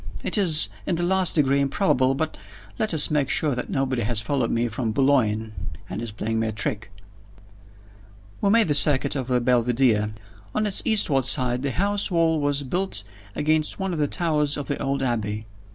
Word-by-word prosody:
It -, -, 0 dB
is 165 Hz, -, +5 dB, 0.2 s
in 180 Hz, -, 0 dB
the 175 Hz, -, -2 dB
last 185 Hz, 0 st, +3 dB
degree 140 Hz, -3 st, +2 dB
improbable 135 Hz, -2 st, +1 dB
but 155 Hz, +3 st, -3 dB, 0.4 s
let 215 Hz, -, 0 dB
us 155 Hz, -3 st, +4 dB
make 145 Hz, -3 st, 0 dB
sure 150 Hz, -3 st, +2 dB
that 125 Hz, -, -5 dB
nobody 130 Hz, -2 st, -1 dB
has 110 Hz, 0 st, -1 dB
followed 120 Hz, +3 st, -1 dB
me 115 Hz, +1 st, 0 dB
from 115 Hz, 0 st, -3 dB
Boulogne, 110 Hz, -5 st, +1 dB, 0.3 s
and 105 Hz, -, -6 dB
is 115 Hz, -2 st, -6 dB
playing 110 Hz, +2 st, -3 dB
me 110 Hz, -, -1 dB
a -, -, -2 dB
trick." 105 Hz, 0 st, -4 dB, 1.5 s
We 200 Hz, -, +2 dB
made 225 Hz, -1 st, +4 dB
the -, -, +2 dB
circuit 140 Hz, -1 st, +3 dB
of 130 Hz, -3 st, -3 dB
the 125 Hz, -1 st, +1 dB
Belvidere. 120 Hz, -3 st, +1 dB, 0.4 s
On 215 Hz, -, 0 dB
its 200 Hz, -2 st, +3 dB
eastward 155 Hz, -, +3 dB
side 125 Hz, -2 st, +2 dB
the 140 Hz, -, -2 dB
house 200 Hz, +7 st, -1 dB
wall 165 Hz, -3 st, +1 dB
was 145 Hz, 0 st, -1 dB
built 175 Hz, -, -2 dB, 0.3 s
against 155 Hz, +3 st, 0 dB
one 190 Hz, -1 st, -3 dB
of 165 Hz, -, -4 dB
the 145 Hz, -, +1 dB
towers 150 Hz, -4 st, 0 dB
of 145 Hz, -, -5 dB
the 140 Hz, -, -4 dB
old 135 Hz, 0 st, -2 dB
Abbey. 110 Hz, -3 st, -3 dB
140 Hz, 190 wpm, -23 LUFS, 120-160 Hz, 1.5 s, is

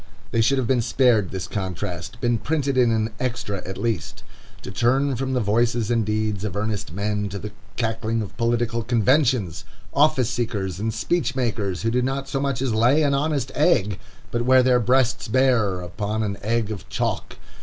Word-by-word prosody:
They 115 Hz, -, +2 dB
should 130 Hz, +5 st, +3 dB
have 130 Hz, -, +1 dB
been 125 Hz, 0 st, +2 dB
spared 115 Hz, -4 st, +3 dB
this 95 Hz, -2 st, -5 dB
contrast, 90 Hz, 0 st, -4 dB
been 120 Hz, -1 st, +1 dB
printed 140 Hz, -1 st, -1 dB
in 125 Hz, -2 st, +4 dB
an 110 Hz, -1 st, 0 dB
extra 120 Hz, -6 st, -2 dB
at 95 Hz, -, -5 dB
least. 115 Hz, -9 st, -3 dB, 0.4 s
To -, -, -6 dB
turn 130 Hz, +7 st, +2 dB
from 130 Hz, +2 st, -2 dB
the 125 Hz, -, +1 dB
voices 115 Hz, +1 st, +1 dB
and 115 Hz, -2 st, +2 dB
deeds 105 Hz, -1 st, -1 dB
of 105 Hz, -3 st, -3 dB
earnest 105 Hz, -3 st, -2 dB
men 105 Hz, +2 st, -2 dB
to 100 Hz, -, -5 dB
the 105 Hz, +2 st, -6 dB, 0.3 s
cackling 115 Hz, -1 st, -1 dB
of 100 Hz, -, -9 dB
political 115 Hz, 0 st, 0 dB
conventions! 120 Hz, -, +2 dB, 0.3 s
Office 135 Hz, -5 st, +3 dB
seekers 100 Hz, -6 st, -2 dB
and 110 Hz, +2 st, -1 dB
speech 130 Hz, +4 st, -1 dB
makers, 105 Hz, -8 st, -1 dB
who 115 Hz, -, +1 dB
do 125 Hz, +2 st, +2 dB
not 135 Hz, +2 st, -2 dB
so 135 Hz, -, -2 dB
much 135 Hz, -2 st, -1 dB
as 125 Hz, -4 st, 0 dB
lay 125 Hz, +8 st, +4 dB
an 140 Hz, -1 st, +2 dB
honest 140 Hz, -2 st, 0 dB
egg, 120 Hz, -, +2 dB, 0.3 s
but 120 Hz, -, 0 dB
wear 130 Hz, +1 st, +5 dB
their 125 Hz, -1 st, +4 dB
breasts 125 Hz, +1 st, +2 dB
bare 110 Hz, -6 st, +2 dB
upon 105 Hz, +4 st, -3 dB
an 100 Hz, -1 st, -2 dB
egg 110 Hz, +1 st, 0 dB
of 100 Hz, -4 st, -7 dB
chalk! -, -, -2 dB
115 Hz, 185 wpm, -23 LUFS, 105-130 Hz, 0.4 s, wear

